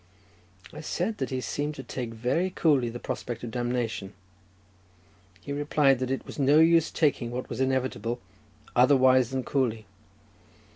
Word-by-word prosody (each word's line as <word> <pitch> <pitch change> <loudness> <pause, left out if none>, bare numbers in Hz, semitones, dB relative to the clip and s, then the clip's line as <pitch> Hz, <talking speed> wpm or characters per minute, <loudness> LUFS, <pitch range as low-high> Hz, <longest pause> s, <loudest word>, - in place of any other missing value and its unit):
I - - -8
said 215 +7 -2
that 130 - -2
he 130 -1 -2
seemed 145 +3 -3
to 135 - -7
take 125 -3 -5
very 125 +11 0
coolly 145 -9 +2
the 120 - -6
prospect 120 -1 -5
of 120 - -5
damnation; 120 -4 -2 1.3
he 140 - -5
replied 145 -2 +2
that 130 -1 -2
it 135 - -2
was - - -9
of 140 - +2
no 145 +3 +6
use 165 0 +5
taking 140 -6 +1
what 125 +1 -5
was 120 +2 -3
inevitable 130 -3 -1 0.6
otherwise 130 -1 +5
than 130 -1 -2
coolly. 115 -6 -1
130 Hz, 155 wpm, -27 LUFS, 120-145 Hz, 1.3 s, no